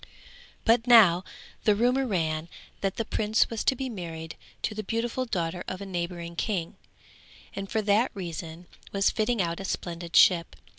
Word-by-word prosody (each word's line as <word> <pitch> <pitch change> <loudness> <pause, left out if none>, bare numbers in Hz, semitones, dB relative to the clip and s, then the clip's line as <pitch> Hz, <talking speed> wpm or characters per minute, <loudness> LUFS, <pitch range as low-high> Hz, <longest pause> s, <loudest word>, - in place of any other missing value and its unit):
But 230 +1 +3
now 195 -7 +7 0.4
the 210 - +4
rumour 250 +4 +2
ran 160 -5 -1 0.3
that 195 -1 -1
the 230 - -2
prince 215 +1 +1
was 225 - -2
to 265 - +3
be 265 +1 -3
married 165 -7 -6 0.3
to 215 - -1
the 215 - -4
beautiful 230 +4 -2
daughter 175 -5 -2
of 185 - -4
a 200 - -6
neighbouring 170 -2 -4
king, 175 -2 -2 0.8
and 195 0 -5
for 220 - 0
that 210 +4 +3
reason 170 -2 -6 0.3
was 200 0 +2
fitting 220 -2 +1
out 170 0 -3
a - - -5
splendid 170 -2 -4
ship. 170 -3 +5
195 Hz, 165 wpm, -27 LUFS, 170-225 Hz, 0.8 s, now